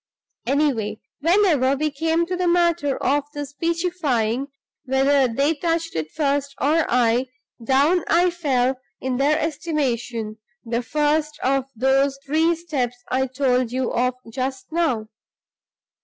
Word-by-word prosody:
Anyway, 245 -7 0 0.2
whenever 320 -5 +3
we 305 +2 -1
came 325 +3 0
to 365 +2 -3
the 360 0 0
matter 340 -5 +2
of 285 +1 +2
the 290 0 -3
speechifying 290 -6 -1 0.4
(whether 270 +1 +3
they 280 +7 +2
touched 330 +1 -2
it 155 -1 -2
first 280 - -1
or 315 +3 +2
I), 245 +1 +2 0.4
down 285 +8 +3
I 350 +2 +3
fell 265 -6 0 0.2
in 260 -1 -2
their 290 +3 +3
estimation 265 -9 -2 0.3
the 235 +1 -1
first 300 +3 0
of 270 0 +1
those 270 +3 +2
three 320 +4 +2
steps 280 -8 -3
I 265 +1 +1
told 255 -2 +1
you 255 0 -1
of 250 +1 +1 0.2
just 265 +4 -4
now. 270 -10 0
280 Hz, 130 wpm, -22 LUFS, 255-320 Hz, 0.4 s, whenever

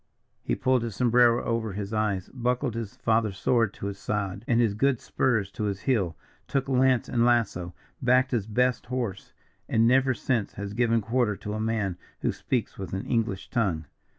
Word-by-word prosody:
He - - -1
pulled 130 -1 +2
his 115 -3 -4
sombrero 120 0 +4
over 115 -3 -1
his 100 +2 -5
eyes, 105 -4 0
buckled 125 -2 0
his 115 -3 -5
father's 110 -3 +1
sword 115 +1 +2
to - - -7
his 100 -1 -4
side, 100 -1 -3
and 120 -1 +3
his 115 -4 +3
good 130 +3 +2
spurs 110 -7 0
to 105 - -3
his 100 -1 -2
heel, 95 - 0 0.3
took 135 -1 -1
lance 130 -2 +3
and 120 -1 +1
lasso, 110 -8 +1 0.3
backed 130 +1 +3
his 115 -5 0
best 125 +3 +1
horse, 120 -6 -3 0.4
and 115 0 +4
never 130 +1 +4
since 120 -6 -1
has 100 0 -6
given 115 0 +2
quarter 115 -1 +1
to 105 +2 -6
a 110 - -3
man 110 -5 -1 0.2
who - - +1
speaks 120 -6 -3
with 95 -2 -6
an 95 - -4
English 115 -5 -1
tongue. 90 -10 0
115 Hz, 185 wpm, -27 LUFS, 100-125 Hz, 0.4 s, sombrero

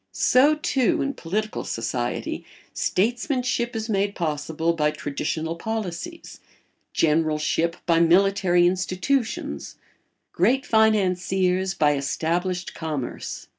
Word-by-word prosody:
So, 285 +4 +4
too, 300 -6 +1
in 280 - -2
political 215 +4 -3
society, - - -3 0.3
statesmanship 245 +2 0
is 220 0 -3
made 200 -2 0
possible 160 0 -1
by 150 -2 +1
traditional 155 +3 -3
policies, 220 - -5 0.5
generalship 160 +1 +1
by 170 -1 +3
military 180 +1 +4
institutions, 185 - -1 0.6
great 245 +10 +2
financiers 190 -3 +2
by 150 -2 +3
established 170 +6 -2
commerce. 150 -6 -5
185 Hz, 95 wpm, -24 LUFS, 165-220 Hz, 0.6 s, So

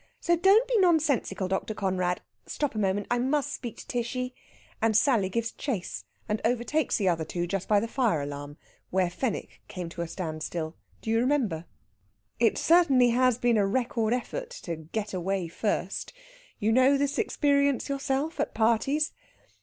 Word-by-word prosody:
"So 345 - +2
don't 390 +8 +5
be 475 -3 +2
nonsensical, 300 - +2
Dr. 190 +3 -2
Conrad.... 185 -3 0 0.3
Stop 290 -2 -2
a 215 - -3
moment. 200 0 0
I 245 - +2
must 285 +3 0
speak 240 -4 -6
to - - -11
Tishy." 250 +1 -2 0.5
And 220 -1 +4
Sally 225 -7 +3
gives 230 +3 -1
chase, 225 -11 -4 0.2
and 210 +1 -1
overtakes 245 +5 +1
the 200 - 0
other 165 -3 +2
two 175 +2 -3
just 190 +1 -3
by 210 -1 +4
the 225 - -2
fire 230 - +1
alarm, 145 +1 -6 0.3
where 185 -1 +1
Fenwick 215 +4 -3
came 180 -3 -6
to 170 +1 -6
a 170 - -2
standstill. 160 -1 -4 0.3
Do 220 - -2
you 225 - +3
remember? 235 - +1 0.7
It - - +3
certainly 275 -8 +5
has 250 -1 +3
been 240 -2 +2
a 200 -2 +3
record 230 0 0
effort 470 - -2
to 170 - -3
"get 200 +7 -5
away 185 0 -1
first." 195 - -2 0.4
You 215 +2 +1
know 260 +4 +5
this 285 +1 0
experience 280 - +2
yourself 275 +2 -2
at - - -1
parties? 235 +7 +2
225 Hz, 170 wpm, -28 LUFS, 190-275 Hz, 0.7 s, don't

